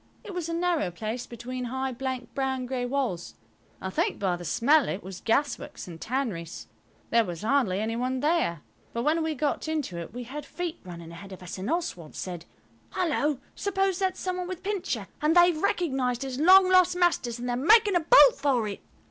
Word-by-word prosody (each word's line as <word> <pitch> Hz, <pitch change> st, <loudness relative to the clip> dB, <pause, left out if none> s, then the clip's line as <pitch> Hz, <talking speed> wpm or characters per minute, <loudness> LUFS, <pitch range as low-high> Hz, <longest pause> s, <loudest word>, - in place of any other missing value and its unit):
It 420 Hz, -4 st, -8 dB
was 350 Hz, -2 st, -3 dB
a -, -, -2 dB
narrow 340 Hz, -, +1 dB
place 220 Hz, +7 st, -5 dB
between 250 Hz, +2 st, -6 dB
high 260 Hz, +2 st, -2 dB
blank 255 Hz, 0 st, -5 dB
brown 265 Hz, -2 st, -1 dB
grey 250 Hz, -1 st, -2 dB
walls. 245 Hz, -10 st, -2 dB, 0.4 s
I 190 Hz, -, -4 dB
think -, -, 0 dB
by 190 Hz, -3 st, 0 dB
the 175 Hz, -, -8 dB
smell 265 Hz, -, +3 dB
it 195 Hz, -, -4 dB
was 190 Hz, 0 st, -8 dB
gasworks 285 Hz, +3 st, -1 dB
and 165 Hz, -2 st, -10 dB
tanneries. 215 Hz, -10 st, -3 dB, 0.5 s
There 230 Hz, 0 st, +5 dB
was 175 Hz, -4 st, -6 dB
hardly 220 Hz, -6 st, +2 dB
any 220 Hz, +2 st, -1 dB
one 255 Hz, +2 st, -1 dB
there, 295 Hz, -, +1 dB, 0.3 s
but 235 Hz, -, -2 dB
when 315 Hz, +4 st, +2 dB
we 320 Hz, -1 st, -1 dB
got 295 Hz, +2 st, -1 dB
into 295 Hz, -, -2 dB
it 170 Hz, -, -7 dB
we 245 Hz, +3 st, -6 dB
heard 285 Hz, +5 st, -7 dB
feet 340 Hz, +4 st, -5 dB
running 170 Hz, -3 st, -9 dB
ahead 195 Hz, +4 st, -10 dB
of 185 Hz, -, -11 dB
us, 180 Hz, +1 st, -7 dB
and 190 Hz, -, -4 dB
Oswald 295 Hz, -, -3 dB
said– 175 Hz, -3 st, -6 dB, 0.5 s
"Hullo, 300 Hz, -5 st, 0 dB
suppose 385 Hz, -2 st, 0 dB
that's 375 Hz, -1 st, 0 dB
some 370 Hz, -1 st, -2 dB
one 360 Hz, -1 st, -3 dB
with 370 Hz, -1 st, -6 dB
Pincher, 365 Hz, -, -2 dB
and 305 Hz, +2 st, +3 dB
they've 350 Hz, -2 st, +5 dB
recognised 270 Hz, -, 0 dB
his 265 Hz, -1 st, -4 dB
long 370 Hz, +3 st, +7 dB
lost 365 Hz, -1 st, +5 dB
masters 345 Hz, -10 st, +1 dB
and 245 Hz, +1 st, -5 dB
they're 245 Hz, -, 0 dB
making 410 Hz, -, +5 dB
a -, -, +5 dB
bolt -, -, +7 dB
for 250 Hz, -6 st, +1 dB
it?" 200 Hz, -, -6 dB
265 Hz, 200 wpm, -27 LUFS, 220-335 Hz, 0.5 s, long